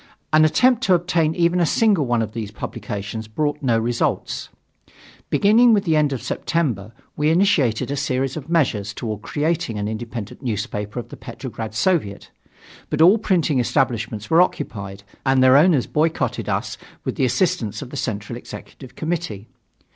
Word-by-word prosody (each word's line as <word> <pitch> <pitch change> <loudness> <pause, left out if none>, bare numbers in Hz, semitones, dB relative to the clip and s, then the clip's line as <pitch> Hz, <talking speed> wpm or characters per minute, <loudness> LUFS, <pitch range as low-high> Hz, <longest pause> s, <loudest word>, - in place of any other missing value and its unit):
An 155 0 +6
attempt 250 +9 +3
to 185 - +5
obtain 170 -2 +1
even 175 0 +2
a 175 - +3
single 200 - +2
one 120 -1 +1
of 110 - -5
these 110 -2 -5
publications 105 +1 -6
brought 145 +6 -2
no 120 -5 +2
results. 120 +1 -1 0.8
Beginning 230 +4 +5
with 205 -2 +3
the 165 -5 +1
end 150 -2 +2
of 135 - -4
September, 120 - -2 0.2
we 150 +1 +1
initiated 155 - +2
a - - -1
series 135 -1 -1
of 155 -1 -7
measures 110 - 0
toward 110 -3 -4
creating 150 -5 -1
an 105 0 -2
independent 110 0 -6
newspaper 105 -3 -4
of 120 - -8
the - - -10
Petrograd 110 -1 -7
Soviet. 125 - 0 0.6
But 150 +1 +3
all 195 +6 +6
printing 170 -9 +1
establishments 115 -4 -1
were 165 +2 +5
occupied 100 - -3 0.2
and 135 -1 +3
their 130 0 +6
owners 150 -3 +5
boycotted 160 +1 -1
us - - -2 0.2
with - - -2
the 135 - +1
assistance 125 - 0
of 130 - -11
the - - -7
Central 110 -2 -4
Executive 130 +1 -11
Committee. 160 - -4
135 Hz, 160 wpm, -21 LUFS, 110-165 Hz, 0.8 s, An